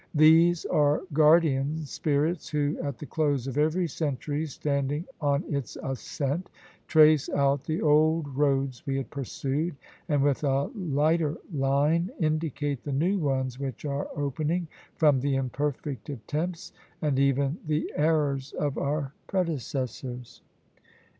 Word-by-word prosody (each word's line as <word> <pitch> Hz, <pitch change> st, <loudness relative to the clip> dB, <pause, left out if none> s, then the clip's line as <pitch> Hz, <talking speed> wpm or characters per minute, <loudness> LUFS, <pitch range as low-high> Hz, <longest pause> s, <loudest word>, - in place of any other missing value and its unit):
These 160 Hz, +3 st, +5 dB
are 150 Hz, +1 st, +2 dB
guardian 155 Hz, -1 st, +3 dB
spirits 150 Hz, +4 st, -1 dB
who, 150 Hz, 0 st, 0 dB
at 140 Hz, -4 st, -4 dB
the -, -, -8 dB
close 145 Hz, -5 st, 0 dB
of 135 Hz, +1 st, -2 dB
every 160 Hz, +4 st, +2 dB
century 150 Hz, +1 st, -2 dB
standing 145 Hz, +2 st, -2 dB, 0.2 s
on 145 Hz, +1 st, +1 dB
its 140 Hz, -, -3 dB
ascent, 140 Hz, +5 st, -3 dB, 0.4 s
trace 155 Hz, -2 st, +5 dB
out 140 Hz, -1 st, +1 dB
the 160 Hz, +1 st, -2 dB
old 155 Hz, +1 st, +3 dB
roads 135 Hz, -3 st, +1 dB
we 135 Hz, 0 st, 0 dB
had 135 Hz, -, -4 dB
pursued, 140 Hz, +4 st, -2 dB, 0.3 s
and 145 Hz, -2 st, +2 dB
with 145 Hz, 0 st, +1 dB
a 140 Hz, 0 st, +1 dB
lighter 160 Hz, -3 st, +1 dB, 0.2 s
line 145 Hz, +5 st, +2 dB
indicate 155 Hz, -4 st, -1 dB
the 145 Hz, -, -4 dB
new 175 Hz, +9 st, +1 dB
ones 130 Hz, -4 st, -1 dB
which 135 Hz, -1 st, -5 dB
are 140 Hz, 0 st, -2 dB
opening, 155 Hz, +5 st, -1 dB, 0.3 s
from 150 Hz, -4 st, +4 dB
the 140 Hz, +1 st, 0 dB
imperfect 135 Hz, -1 st, -3 dB
attempts, 150 Hz, -, -4 dB, 0.3 s
and 145 Hz, -4 st, 0 dB
even 140 Hz, +2 st, +2 dB
the 155 Hz, 0 st, -1 dB
errors 145 Hz, -3 st, +1 dB
of 145 Hz, -2 st, -2 dB
our 140 Hz, -1 st, -2 dB
predecessors! 130 Hz, -, -3 dB
145 Hz, 130 wpm, -27 LUFS, 135-155 Hz, 0.4 s, These